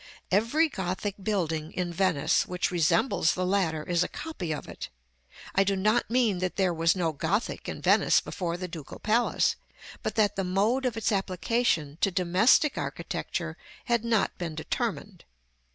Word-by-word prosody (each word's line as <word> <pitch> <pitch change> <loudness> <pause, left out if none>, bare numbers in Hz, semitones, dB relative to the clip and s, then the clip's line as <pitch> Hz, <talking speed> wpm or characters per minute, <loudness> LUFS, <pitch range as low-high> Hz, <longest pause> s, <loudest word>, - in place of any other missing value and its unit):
Every 230 - +3
Gothic 190 - -3
building 165 -6 -2
in 175 -1 -2
Venice 175 -5 +2
which 180 0 -1
resembles 175 - +2
the 185 - -1
latter 180 -5 0
is 175 +1 +1
a - - -2
copy 295 - -5
of 150 - -4
it. - - -7 0.6
I 195 - +4
do 195 0 +1
not 215 +5 +1
mean 230 -6 +2
that 185 0 -2
there 190 -3 +1
was 165 +1 +2
no 170 -3 0
Gothic 170 +10 -2
in - - -6
Venice - - +4
before 170 -2 -4
the 185 0 -5
Ducal 160 -5 -8
Palace, 230 +3 +1 0.4
but - - -3
that 210 -2 +2
the 195 - 0
mode 210 +8 +1
of 235 -3 -3
its 225 - 0
application 185 -5 0
to - - +4
domestic 190 - +3
architecture - - -4 0.3
had 235 -3 +1
not 230 -3 +1
been 165 -3 -4
determined. 160 - -3
190 Hz, 165 wpm, -28 LUFS, 170-220 Hz, 0.6 s, I